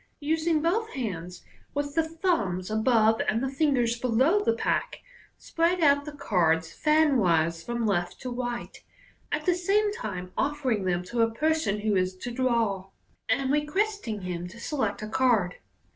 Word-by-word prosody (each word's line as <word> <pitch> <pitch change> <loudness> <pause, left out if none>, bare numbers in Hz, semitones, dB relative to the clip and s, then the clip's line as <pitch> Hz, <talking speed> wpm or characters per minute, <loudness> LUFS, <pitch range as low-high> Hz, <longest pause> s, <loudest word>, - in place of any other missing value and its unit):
Using 315 +1 0
both 440 +7 +1
hands, 180 - -5 0.3
with 285 0 -2
the 325 - +3
thumbs 320 - -1
above 220 0 +3
and 225 +4 0
the 265 - 0
fingers 265 -5 +1
below 260 - +2
the 460 +1 +2
pack, - - -1 0.4
spread 335 +2 0
out 285 -1 +4
the 300 - -6
cards 165 - +1
fanwise 190 - +2
from 235 +2 -2
left 175 -4 -1
to 255 - -5
right, 245 -1 -4 0.6
at - - -2
the 360 - +4
same 405 +4 +1
time 185 - -5
offering 270 -8 0
them 180 -1 0
to 235 +7 -7
the 230 -1 +4
person 285 -4 0
who 210 -1 +1
is 185 0 0
to 240 +6 -6
draw, 230 -6 0 0.4
and 270 -1 +1
requesting 300 - -1
him 180 -1 -4
to 210 +6 -12
select 225 -7 -2
a - - -4
card. 220 -6 +2
240 Hz, 160 wpm, -27 LUFS, 195-305 Hz, 0.6 s, out